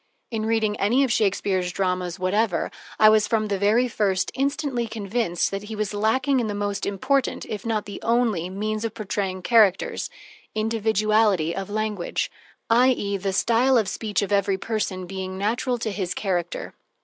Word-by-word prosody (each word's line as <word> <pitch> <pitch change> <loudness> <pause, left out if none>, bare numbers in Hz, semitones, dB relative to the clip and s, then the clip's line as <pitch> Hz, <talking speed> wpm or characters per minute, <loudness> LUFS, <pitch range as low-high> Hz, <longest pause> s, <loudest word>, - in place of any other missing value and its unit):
In 220 -1 -2
reading 220 -2 +1
any 240 +7 +3
of 260 - 0
Shakespeare's 195 -3 +1
dramas 180 -2 -1
whatever, 185 0 0 0.3
I 215 - +7
was, 215 -1 +5
from 215 -2 0
the 200 -1 -1
very 220 +5 +3
first, 200 -5 0
instantly 275 -3 -1
convinced 215 -4 -1
that 195 +1 -4
he 220 +1 -6
was 210 -1 -2
lacking 255 +6 +2
in 235 - -1
the 205 - -3
most 205 0 -2
important, 260 +7 0
if 210 +1 -5
not 215 -2 0
the 200 - -8
only, 225 -7 +1
means 215 +3 -3
of 230 0 -3
portraying 195 -3 -3
characters: 215 -5 +3 0.5
individuality 215 -5 +2
of 195 0 -4
language, 210 -3 -2 0.4
i.e., 235 -4 +3
the 195 0 -2
style 240 +6 +3
of 220 -4 +2
speech 210 -2 -1
of 200 - -4
every 200 -1 +2
person 195 -3 -3
being 190 0 -5
natural 240 +5 0
to 225 -2 -3
his 190 -3 -3
character. 175 -4 -2
210 Hz, 165 wpm, -24 LUFS, 195-225 Hz, 0.5 s, I